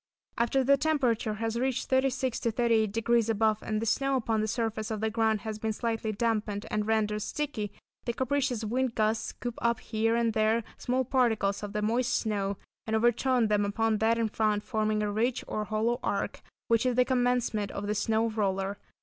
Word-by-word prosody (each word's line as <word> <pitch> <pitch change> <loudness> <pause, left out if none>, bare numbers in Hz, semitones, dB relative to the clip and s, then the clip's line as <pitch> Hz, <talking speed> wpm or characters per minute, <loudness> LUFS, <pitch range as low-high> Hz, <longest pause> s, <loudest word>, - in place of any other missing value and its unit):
After 240 +3 +2
the 280 +2 +5
temperature 260 -8 +1
has 225 +2 -2
reached 260 0 -1
36° 260 -1 +1
to 230 - +1
38° 230 0 +2
above 220 -1 +2
and 215 0 -2
the 225 - -2
snow 275 +4 +1
upon 225 -3 0
the 215 - 0
surface 220 -1 -2
of 220 -1 -3
the 220 +1 -1
ground 220 -1 +1
has 215 -1 -5
been 220 0 -1
slightly 225 -1 -2
dampened 215 -1 -1
and 210 0 -1
rendered 215 -1 +1
sticky, 220 -7 -3 0.3
the 235 - -1
capricious 260 -2 0
wind 250 +2 -1
gusts 220 0 +1
scoop 240 -1 -6
up 235 -1 +1
here 225 +1 0
and 230 -1 +1
there 220 +1 +2 0.2
small 255 +1 0
particles 225 -6 +1
of 205 -1 -6
the 210 -1 -1
moist 240 +4 +1
snow, 200 -3 -1 0.3
and 220 - 0
overturn 240 +1 +3
them 210 -1 +2
upon 220 +1 0
that 225 +1 +3
in 230 -1 +1
front, 210 -1 0
forming 215 -2 0
a 205 - -1
ridge 235 +4 0
or 215 - -2
hollow 220 +3 0
arch, 200 - -2 0.3
which 230 -1 +3
is 250 - +1
the 250 0 +4
commencement 245 -5 +1
of 200 - -5
the 210 - 0
snow 220 +2 +1
roller. 195 -2 -1
225 Hz, 190 wpm, -29 LUFS, 215-240 Hz, 0.3 s, the